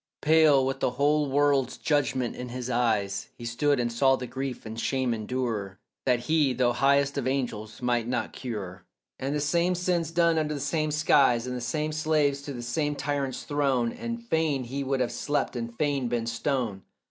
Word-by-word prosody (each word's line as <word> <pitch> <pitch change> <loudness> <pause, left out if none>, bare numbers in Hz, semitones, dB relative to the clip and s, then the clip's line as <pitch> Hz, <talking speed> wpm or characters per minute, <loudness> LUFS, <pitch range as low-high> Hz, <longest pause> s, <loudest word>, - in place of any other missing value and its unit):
Pale, 155 -3 +5
with 135 0 -2
the - - +2
whole 145 +1 +2
world's 140 -2 +2
judgment 135 -5 0
in 125 0 -6
his 125 +1 -4
eyes, 110 -5 0
He 120 - -8
stood 135 +4 +1
and 120 -1 0
saw 135 +2 +4
the 125 - -5
grief 130 -1 -5
and 110 +1 -6
shame 130 -1 0
endure 110 -4 -3 0.3
That 125 -2 +3
he, 150 0 +2
though 120 -1 +2
highest 140 +2 +2
of - - -2
angels 120 -4 -3
might 120 -2 +1
not 125 0 -2
cure, 100 -7 -6 0.4
And 135 +2 -2
the - - 0
same 170 +5 +1
sins 175 -2 0
done 170 -1 +3
under 150 -1 -1
the - - -4
same 155 +2 0
skies, 140 -5 +3
And 125 0 -4
the 125 - -4
same 150 +6 -1
slaves 155 -2 +1
to 145 - -7
the 120 -2 -6
same 145 +5 -1
tyrants 140 -2 -2
thrown, 135 -5 +1
And 235 0 -5
fain 160 - +1
he 135 +3 -4
would 135 -1 0
have 125 - 0
slept, 145 -2 -1
and 115 -1 -3
fain 140 -3 0
been 120 -1 -1
stone. 115 -3 -2
135 Hz, 195 wpm, -27 LUFS, 120-145 Hz, 0.4 s, Pale